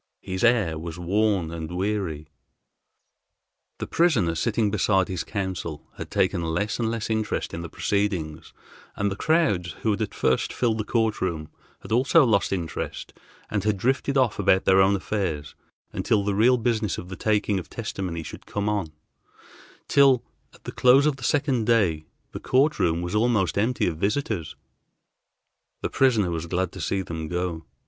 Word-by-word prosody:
His 95 +2 -4
air 110 -10 +3
was 85 +1 -6
worn 95 -1 +1
and 80 -1 -6
weary. 95 -6 -2 1.5
The - - -4
prisoner, 155 - +2
sitting 110 +4 0
beside 95 -2 +2
his 90 -3 -3
counsel, 95 -6 -4
had - - -7
taken 85 - +1
less 85 +8 -2
and 115 -2 0
less 115 -2 -3
interest 110 -1 -2
in 85 - -4
the 85 - -7
proceedings, 95 -7 -2 0.4
and 100 0 -1
the - - -3
crowds, 105 - +1
who 110 - +2
had 105 - -2
at 110 - -3
first 65 - +1
filled 115 -3 0
the - - 0
court 110 -2 0
room, 80 -4 -2 0.3
had - - -11
also 135 +6 +5
lost 100 -6 +2
interest 85 -5 -4 0.4
and 100 -3 -1
had 105 -1 +1
drifted 135 +6 0
off 125 -6 +2
about 95 -1 +3
their 95 0 +5
own 95 +1 +4
affairs 90 -7 -3 0.4
until 105 -2 +1
the 100 0 0
real 120 +5 +4
business 110 -5 0
of 90 - -7
the 95 - -6
taking 105 -1 +1
of 85 - -10
testimony 85 -4 -4
should - - -10
come 100 0 -2
on, 100 -7 -1 1.0
till, 135 -3 +5 0.3
at - - -21
the - - -6
close 130 +3 +5
of 150 -3 +1
the 130 - -11
second 135 -4 +1
day, 90 -10 +2 0.2
the - - -6
court 140 +4 +2
room 85 0 +1
was 90 - -4
almost 105 -5 +2
empty 115 +5 +1
of 80 -3 -1
visitors. 100 - -2 1.3
The - - -2
prisoner 115 -9 +3
was 85 0 -3
glad 90 +1 -1
to - - -8
see 95 -1 -1
them 80 -2 -5
go. 90 -1 -3
100 Hz, 170 wpm, -25 LUFS, 85-115 Hz, 1.5 s, also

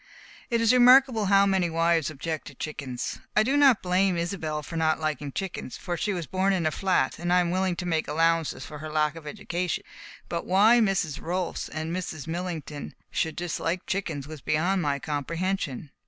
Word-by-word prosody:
It 235 -2 +1
is 230 +1 +4
remarkable 250 -2 +6
how 200 0 +5
many 190 -3 +2
wives 165 -1 +2
object 155 +1 -5
to 145 - -10
chickens. 130 -4 -5 0.2
I 215 - +6
do 265 +5 +1
not 275 -6 +5
blame 185 0 +2
Isobel 165 -3 -3
for 165 - -8
not 160 -1 +1
liking 150 -2 -2
chickens, 185 -6 -5
for 175 -2 -4
she 205 - -1
was 175 -4 -3
born 190 +5 +1
in 180 -4 0
a 155 - +2
flat, 185 -9 0
and 175 +1 -2
I 180 - +5
am 175 -1 +1
willing 185 0 0
to 180 - -5
make 160 -2 0
allowances 165 +1 +1
for 150 - -9
her 155 +1 -6
lack 150 0 +1
of 160 -2 -10
education; 175 +4 -3 0.4
but 170 -1 -4
why 210 +6 +6
Mrs. 195 -8 0
Rolfs 180 +1 -3
and 160 +2 -4
Mrs. 160 -6 -5
Millington 165 -4 -5 0.2
should 160 -2 -1
dislike 175 0 -2
chickens 160 -8 -3
was 155 -2 -9
beyond 175 +7 +1
my 145 -3 0
comprehension. 155 0 -3
170 Hz, 190 wpm, -26 LUFS, 155-190 Hz, 0.4 s, remarkable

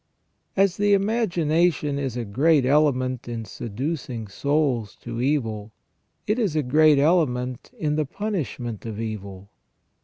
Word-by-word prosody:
"* - - -48
As 195 -2 +3
the 205 0 +4
imagination 175 -8 +1
is 130 -4 -3
a 120 - -3
great 140 +7 +3
element 130 -3 +2
in 115 -2 -4
seducing 125 +1 -4
souls 135 -2 0
to 120 0 -5
evil, 115 -6 -1 0.5
it 210 +4 0
is 200 -9 0
a 155 - +2
great 150 +3 +5
element 130 -6 +1
in 150 -1 -1
the 155 - +1
punishment 145 - -4
of 110 -1 -5
evil. 100 -3 -6
140 Hz, 135 wpm, -24 LUFS, 115-160 Hz, 0.5 s, great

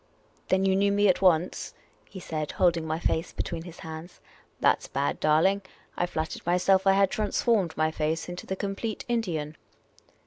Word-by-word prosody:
" - - -36
Then 190 +1 +3
you 190 0 +3
knew 200 +1 +3
me 205 +1 +3
at 185 - +3
once? 180 -2 +2 0.2
" - - -33
he 190 - -9
said, 155 -4 -4
holding 170 -3 +2
my 160 0 -1
face 165 0 -1
between 165 -1 -4
his 175 -1 -11
hands. 160 +2 -9 0.2
" - - -34
That - - +3
's - - -9
bad, 140 +1 -1
darling! 165 +6 +3 0.3
I 175 - 0
flattered 160 -2 -4
myself 185 +2 +3
I 195 - +7
had 195 -1 +3
transformed 210 -3 +1
my 155 0 +2
face 160 +1 -2
into 175 0 -7
the 190 - -2
complete 200 +3 -4
Indian." 170 -11 -2
175 Hz, 195 wpm, -27 LUFS, 160-195 Hz, 0.3 s, I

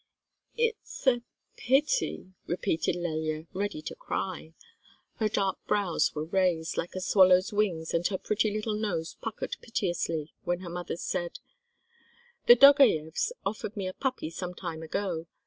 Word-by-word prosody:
"It's—a—pity," 270 - 0
repeated 170 -2 0
Lelya, 155 -2 -2
ready 195 -5 -3
to - - -5
cry. 165 -4 -4 0.6
Her 215 -1 +1
dark 195 -2 0
brows 195 -7 +1
were 150 +1 -2
raised, 175 -2 +1
like 175 - -3
a - - -2
swallow's 185 0 +5
wings, 180 -6 0
and 170 +1 +2
her 190 - -2
pretty 215 +3 0
little 215 +1 -2
nose 200 -7 -2
puckered 485 - -4
piteously, 175 -8 -2
when 175 +1 -1
her 175 -2 -7
mother 175 -1 -4
said: 175 -1 -3 1.1
"The 240 - +11
Dogayevs 255 - +6
offered 210 +1 -3
me 195 - -2
a 185 - -4
puppy 260 - -2
some 180 +1 -5
time 160 -2 -5
ago. 170 0 -3
185 Hz, 135 wpm, -29 LUFS, 165-215 Hz, 1.1 s, The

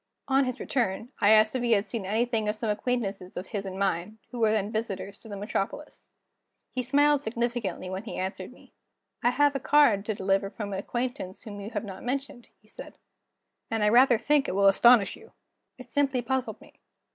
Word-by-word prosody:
On 270 0 +3
his 255 -1 -4
return, 230 -2 -1
I 205 - +4
asked 215 +2 +5
if 255 - 0
he 240 -1 +2
had 205 -1 +2
seen 220 -6 -5
anything 220 0 0
of 210 - -1
some 215 0 -2
acquaintances 205 -4 -3
of 185 - -4
his 195 0 -5
and 190 - -6
of - - -7
mine, 195 +2 -1
who 245 - -6
were 220 -2 +3
then 210 -1 0
visitors 205 -3 -4
to 225 - -14
the 205 - -6
metropolis. 205 +8 -4 0.6
He 255 - -2
smiled 290 +3 +3
significantly 235 -6 -3
when 190 +3 -5
he - - -6
answered 190 +2 -4
me. - - -19 0.5
"I 245 - +5
have 285 +3 +2
a - - 0
card 265 -8 +4
to 215 - -1
deliver 195 +1 0
from 205 -1 -6
an 190 - -2
acquaintance 240 -3 -4
whom 205 -2 -8
you 200 - -6
have 230 - -4
not 190 -2 -8
mentioned," 270 0 -4
he 215 - -28
said; - - -11 0.7
"and 225 -1 -1
I 210 - +4
rather 245 +1 +6
think 290 +4 +2
it - - -2
will 200 0 +3
astonish 220 +1 +5
you." 450 - -17 0.4
It 255 - -11
simply 275 -2 +1
puzzled 260 +2 -2
me. - - -19
220 Hz, 210 wpm, -27 LUFS, 200-250 Hz, 0.7 s, rather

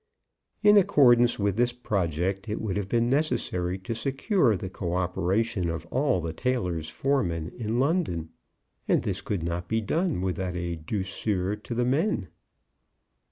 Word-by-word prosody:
In 210 0 +7
accordance 120 -10 +5
with 100 -1 0
this 120 0 +2
project 95 -4 -1
it 105 - -2
would 105 -4 -2
have 100 -1 -2
been 120 +1 +2
necessary 95 - 0
to 95 +4 -5
secure 135 - +1
the 95 - -5
co 90 -1 -3
operation 95 +2 0
of 85 0 -4
all 130 -6 +2
the 85 -1 -4
tailors' 90 -9 -1
foremen 85 - -1
in 115 0 -2
London, 135 - 0 0.6
and - - +2
this - - -2
could 95 -6 -3
not 85 +1 -3
be 110 - +1
done 155 - 0
without 95 -1 -2
a 85 -1 -2
douceur 95 +3 -2
to 115 +3 -6
the 120 +1 +1
men. 135 - 0
100 Hz, 155 wpm, -27 LUFS, 90-125 Hz, 0.6 s, In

